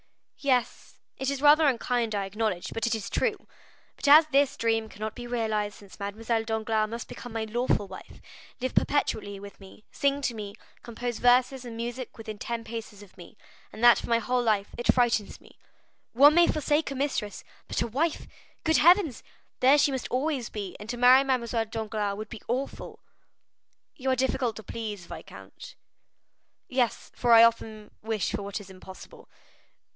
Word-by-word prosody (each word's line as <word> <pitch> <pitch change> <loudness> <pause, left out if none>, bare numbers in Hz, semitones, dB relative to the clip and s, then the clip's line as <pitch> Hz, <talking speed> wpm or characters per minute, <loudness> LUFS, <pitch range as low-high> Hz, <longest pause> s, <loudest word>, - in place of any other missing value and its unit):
"Yes; 255 -4 -1 0.2
it 265 - -1
is 280 0 -3
rather 300 +1 +6
unkind, 240 -3 0
I 200 -1 -1
acknowledge, 200 -2 -3
but 225 +1 -1
it 235 - +1
is 220 - -5
true. 430 -3 -1 0.5
But - - -5
as 305 +3 +9
this 280 0 +3
dream 225 -1 0
cannot 215 +1 -6
be 240 0 -8
realized, 220 -3 -1
since 200 -1 -15
Mademoiselle 220 +3 -2
Danglars 220 -1 -1
must 230 +1 -6
become 245 - -9
my 225 -1 -2
lawful 220 -2 0
wife, 190 0 -12 0.4
live 255 +1 -3
perpetually 205 -8 0
with 200 0 -12
me, 195 +2 -15
sing 280 0 0
to 245 - 0
me, 205 -2 -7 0.3
compose 240 0 -5
verses 250 +1 +3
and 235 -2 -8
music 240 +2 -5
within 220 -2 -8
ten 235 -1 -4
paces 220 -3 -8
of 200 - -18
me, 175 +4 -14 0.3
and 225 - -9
that 240 0 +7
for - - -7
my 230 - +4
whole 245 +2 0
life, 215 -4 +1
it 240 - +2
frightens 235 -4 0
me. - - -21 0.5
One 285 +5 +7
may 345 +1 +5
forsake 300 0 0
a 275 - -5
mistress, 265 -7 -3 0.2
but - - -1
a - - -3
wife,—good 320 +4 -2
heavens! 340 - +4 0.4
There 270 +3 +6
she 285 -1 +3
must 265 -2 -3
always 265 -2 -1
be; 200 -3 -6
and 210 +1 -10
to 245 - -3
marry 250 +2 +7
Mademoiselle 235 -4 0
Danglars 215 -2 -3
would 215 - -7
be 225 - -9
awful." 260 +3 -4 0.9
"You 265 -2 -3
are 260 - +3
difficult 255 -2 0
to 220 - -9
please, 210 -3 -6
viscount." - - -11 0.9
"Yes, 250 -2 -1
for 240 -1 +2
I 230 0 +9
often 220 -2 0
wish 220 -2 -2
for 210 0 -3
what 200 +1 -5
is 195 -2 -12
impossible." 190 0 -13
230 Hz, 175 wpm, -27 LUFS, 215-260 Hz, 0.9 s, as